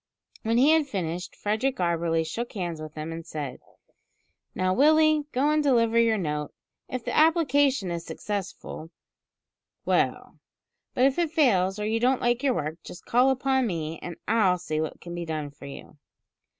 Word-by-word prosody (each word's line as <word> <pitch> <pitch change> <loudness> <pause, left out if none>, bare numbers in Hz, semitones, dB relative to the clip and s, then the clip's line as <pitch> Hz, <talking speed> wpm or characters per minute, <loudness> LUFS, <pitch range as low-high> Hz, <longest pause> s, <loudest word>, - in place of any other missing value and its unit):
When 225 +1 +1
he 275 +5 +5
had 320 -2 +3
finished, 180 - -4
Frederick 220 +6 -1
Auberly 170 -2 0
shook 230 +10 -5
hands 175 -6 -4
with 155 -1 -9
him 155 +1 -5
and 165 0 -6
said: 150 -5 -6 1.0
"Now, 185 0 +1
Willie, 310 +3 +4
go 275 +4 +2
and 305 0 +2
deliver 230 -5 +3
your 230 -1 +3
note. 150 -5 -3 0.3
If 255 -2 -5
the - - -2
application 285 - +3
is 170 -1 -4
successful, 195 -5 -6 1.0
well; - - 0 0.6
but 250 - +4
if 270 +4 +2
it 340 -2 +1
fails, 210 - +2
or 210 - -3
you 220 +1 0
don't 250 +2 +2
like 240 +1 +1
your 270 -3 +2
work, 155 +3 -3
just 175 - -11
call 250 +3 +4
upon 265 -1 +1
me, 165 -4 -4
and 175 - -6
I'll 205 -5 +3
see 155 -3 -3
what 155 - -5
can 175 - -8
be 175 0 -4
done 155 -3 -4
for 140 0 -12
you." 140 +1 -11
210 Hz, 175 wpm, -26 LUFS, 165-265 Hz, 1.0 s, he